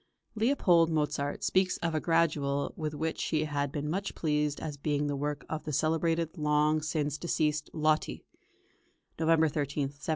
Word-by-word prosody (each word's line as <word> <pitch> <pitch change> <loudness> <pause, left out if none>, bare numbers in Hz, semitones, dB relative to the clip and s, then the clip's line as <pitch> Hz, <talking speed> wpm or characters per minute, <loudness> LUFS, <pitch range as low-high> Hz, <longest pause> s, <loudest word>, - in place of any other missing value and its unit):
Leopold 215 - +3
Mozart 150 -2 -1
speaks 185 -1 +2
of 165 -1 -2
a 155 - +1
Gradual 150 -4 +1
with 155 -2 -3
which 160 +2 -2
he 155 -1 +1
had 145 -2 -2
been 150 0 -3
much 195 +6 -2
pleased 150 -2 0
as 155 -2 -5
being 145 0 -1
the 145 -1 -1
work 145 +1 -3
of 155 -1 -4
"the 155 - -4
celebrated 165 +2 0
long 150 +1 +2
since 150 -2 -2
deceased 150 -3 0
Lotti" 155 -1 0 1.0
(November 160 0 +4
13, 145 -1 -1
1777). 145 +1 -20
155 Hz, 160 wpm, -30 LUFS, 145-165 Hz, 1.0 s, November